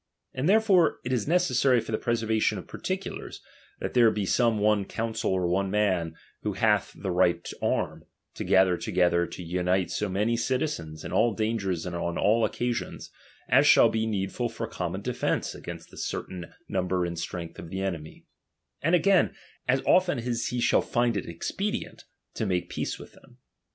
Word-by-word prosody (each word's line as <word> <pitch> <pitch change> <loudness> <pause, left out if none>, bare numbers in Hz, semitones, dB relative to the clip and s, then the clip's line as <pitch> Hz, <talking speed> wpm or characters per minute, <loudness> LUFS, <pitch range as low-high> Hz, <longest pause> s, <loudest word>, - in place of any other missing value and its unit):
And 135 +6 0
therefore 200 -6 +4
it 130 - -1
is 120 -1 0
necessary 135 -6 +3
for 115 - -6
the 110 - 0
preservation 110 -2 +1
of - - -7
particulars, - - -5 0.4
that - - -4
there 120 -2 +6
be 105 -2 -1
some 115 +2 +2
one 105 -1 +3
council 115 +1 -2
or 90 -2 +1
one 95 +2 +1
man, 95 -6 +1 0.3
who - - -2
hath - - +2
the 95 - -3
right 85 -1 +2
to - - -8
arm, - - -1 0.3
to - - -5
gather 95 -2 +4
to - - -5
gether, 85 -1 +3
to 90 - -8
unite 90 +1 0
so 105 - -1
many 105 +5 +1
citizens, 120 - -2
in - - -5
all 115 -2 +3
dangers 105 -6 -1
and 90 -1 -4
on 85 0 -2
all 110 +3 +3
occasions, 120 +2 -2 0.4
as - - +5
shall - - +7
be 110 0 -1
needful 105 +3 -2
for 115 0 -4
common 95 -3 -4
defence 125 +1 -1
against - - -9
the - - -14
certain 90 -2 -5 0.2
number 90 -1 0
and 85 -1 -4
strength 85 -1 -6
of 80 - -8
the 95 +2 -4
enemy; 85 -5 -5 0.6
and 165 +4 +3
again, 185 +2 +3 0.3
as 130 +1 +2
often 180 -5 +4
as 120 -1 -2
he 125 - -2
shall - - +3
find 120 -1 +1
it 100 - -3
expedient, 205 - -4 0.3
to 110 - -2
make 90 -2 -1
peace - - -3
with - - -12
them. 125 -2 -20
105 Hz, 180 wpm, -27 LUFS, 90-120 Hz, 0.6 s, shall